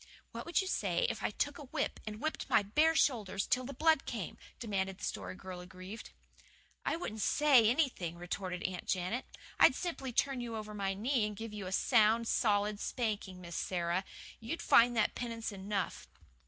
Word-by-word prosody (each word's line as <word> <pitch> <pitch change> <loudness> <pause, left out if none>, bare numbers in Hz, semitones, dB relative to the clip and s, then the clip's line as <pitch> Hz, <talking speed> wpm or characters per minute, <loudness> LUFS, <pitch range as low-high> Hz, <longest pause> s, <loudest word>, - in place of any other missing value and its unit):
"What - - -7
would 345 - +2
you 380 - -4
say - - +1
if - - -7
I - - +1
took 290 0 -2
a 295 - -8
whip 255 - -2
and 215 0 -5
whipped 315 +4 -3
my 205 - +5
bare 305 +11 +3
shoulders 205 -10 +2
till 255 0 +1
the 275 - -5
blood 320 +3 +3
came?" - - -4 0.2
demanded 195 -4 -2
the - - -13
Story 95 -2 -4
Girl 185 - -8
aggrieved. 185 +4 -9 0.7
"I - - 0
wouldn't 220 -11 -4
SAY 265 -3 +5
anything," 240 - 0
retorted 180 +1 -4
Aunt 185 -1 -4
Janet. 185 +7 -1 0.3
"I'd 260 - +7
simply 305 -7 -3
turn 265 +1 +1
you 235 -1 -4
over 215 -1 -6
my 195 -2 -1
knee 230 +1 +1
and 210 - -6
give 225 0 -6
you 205 -3 -5
a - - -5
sound, 225 +2 +4
solid 205 -2 +2
spanking, 210 -7 -3
Miss 170 -1 -7
Sara. 175 0 -1 0.4
You'd 230 +9 -4
find 240 0 +6
that 215 - +3
penance 230 -2 -4
enough." 195 -1 -3
215 Hz, 185 wpm, -33 LUFS, 190-250 Hz, 0.7 s, I'd